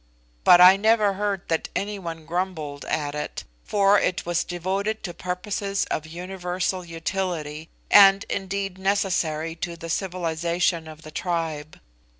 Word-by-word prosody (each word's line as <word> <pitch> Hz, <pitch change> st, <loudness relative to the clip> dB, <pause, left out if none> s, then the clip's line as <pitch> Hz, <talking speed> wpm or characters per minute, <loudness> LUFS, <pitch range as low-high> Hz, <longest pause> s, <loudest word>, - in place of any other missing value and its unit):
But 175 Hz, -, +8 dB
I 180 Hz, +2 st, +9 dB
never 215 Hz, -1 st, +3 dB
heard 200 Hz, -1 st, -2 dB
that 165 Hz, -1 st, -1 dB
any 205 Hz, 0 st, -2 dB
one 165 Hz, -3 st, -7 dB
grumbled 165 Hz, -4 st, -3 dB
at 145 Hz, -2 st, -2 dB
it, 150 Hz, 0 st, -5 dB, 0.2 s
for 200 Hz, 0 st, +4 dB
it 180 Hz, -, -1 dB
was 175 Hz, 0 st, 0 dB
devoted 195 Hz, +5 st, -2 dB
to 175 Hz, -, -5 dB
purposes 195 Hz, +3 st, -2 dB
of 155 Hz, -, -2 dB
universal 180 Hz, +2 st, -3 dB
utility, 165 Hz, -2 st, -4 dB, 0.2 s
and 195 Hz, -1 st, +7 dB
indeed 195 Hz, -1 st, -3 dB
necessary 175 Hz, -5 st, 0 dB
to 170 Hz, 0 st, -4 dB
the 165 Hz, 0 st, -6 dB
civilisation 170 Hz, -2 st, -1 dB
of 155 Hz, +1 st, -11 dB
the 155 Hz, -, -10 dB
tribe. 160 Hz, -3 st, -3 dB
180 Hz, 140 wpm, -24 LUFS, 165-195 Hz, 0.2 s, I